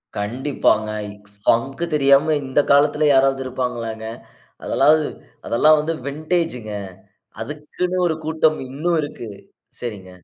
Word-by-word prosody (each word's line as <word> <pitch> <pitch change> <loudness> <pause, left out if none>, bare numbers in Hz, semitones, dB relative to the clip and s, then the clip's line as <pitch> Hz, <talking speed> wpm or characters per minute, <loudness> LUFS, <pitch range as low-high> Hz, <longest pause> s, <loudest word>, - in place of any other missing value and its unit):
கண்டிப்பாங்க. 110 0 0 0.5
ஃபங்கு 135 +8 +1
தெரியாம 145 +2 +4
இந்த 130 +2 +1
காலத்துல 150 +1 +4
யாராவது 135 0 +3
இருப்பாங்களாங்க. 120 -3 -4 0.6
அதெல்லாம் 150 +3 +4 0.5
அதெல்லா 150 +6 +4
வந்து 165 +2 -2
வின்டேஜுங்க. 155 -6 -2 0.7
அதுக்குன்னு 155 +5 -4
ஒரு 160 -2 0
கூட்டம் 160 -1 +2
இன்னு 155 +6 -2
இருக்கு. 135 -6 -7 0.5
சரிங்க. 100 -6 -6
140 Hz, 100 wpm, -21 LUFS, 120-155 Hz, 0.7 s, தெரியாம